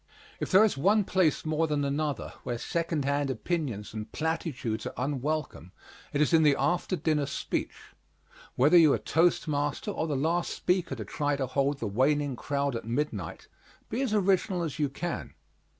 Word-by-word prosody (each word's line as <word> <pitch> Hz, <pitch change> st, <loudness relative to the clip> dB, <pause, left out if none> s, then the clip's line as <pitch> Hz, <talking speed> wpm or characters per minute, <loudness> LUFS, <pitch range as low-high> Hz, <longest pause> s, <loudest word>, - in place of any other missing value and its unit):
If -, -, -3 dB
there 195 Hz, +2 st, +7 dB
is 215 Hz, -, 0 dB
one 205 Hz, +7 st, +4 dB
place 185 Hz, -5 st, +1 dB
more 155 Hz, +1 st, +1 dB
than 145 Hz, -2 st, 0 dB
another 145 Hz, +1 st, -2 dB
where 120 Hz, -, -3 dB
second 165 Hz, +1 st, -2 dB
hand 140 Hz, 0 st, 0 dB
opinions 130 Hz, -, -3 dB
and 110 Hz, 0 st, -6 dB
platitudes 150 Hz, -8 st, -2 dB
are -, -, -7 dB
unwelcome 140 Hz, -, -3 dB, 0.4 s
it 145 Hz, -, -1 dB
is 150 Hz, -, +2 dB
in 165 Hz, -, +6 dB
the 150 Hz, -3 st, +5 dB
after 175 Hz, +2 st, 0 dB
dinner 150 Hz, -3 st, 0 dB
speech. 140 Hz, -, -4 dB, 0.6 s
Whether 145 Hz, +7 st, +5 dB
you 160 Hz, -4 st, +7 dB
are -, -, +2 dB
toast 165 Hz, +2 st, +2 dB
master 145 Hz, -1 st, -1 dB
or 160 Hz, -, -2 dB
the 150 Hz, -, -1 dB
last 170 Hz, +5 st, 0 dB
speaker 180 Hz, -6 st, 0 dB
to 110 Hz, -4 st, -6 dB
try 145 Hz, +7 st, -1 dB
to 135 Hz, -1 st, -1 dB
hold 140 Hz, +2 st, 0 dB
the 120 Hz, -, -4 dB
waning 135 Hz, +6 st, +1 dB
crowd 140 Hz, +1 st, -1 dB
at 115 Hz, -, -4 dB
midnight, 115 Hz, -, -3 dB, 0.4 s
be 240 Hz, -, -1 dB
as 265 Hz, -5 st, 0 dB
original 190 Hz, -3 st, +2 dB
as 155 Hz, -1 st, -4 dB
you 145 Hz, -2 st, +1 dB
can. 170 Hz, +5 st, -5 dB
150 Hz, 180 wpm, -28 LUFS, 135-165 Hz, 0.6 s, there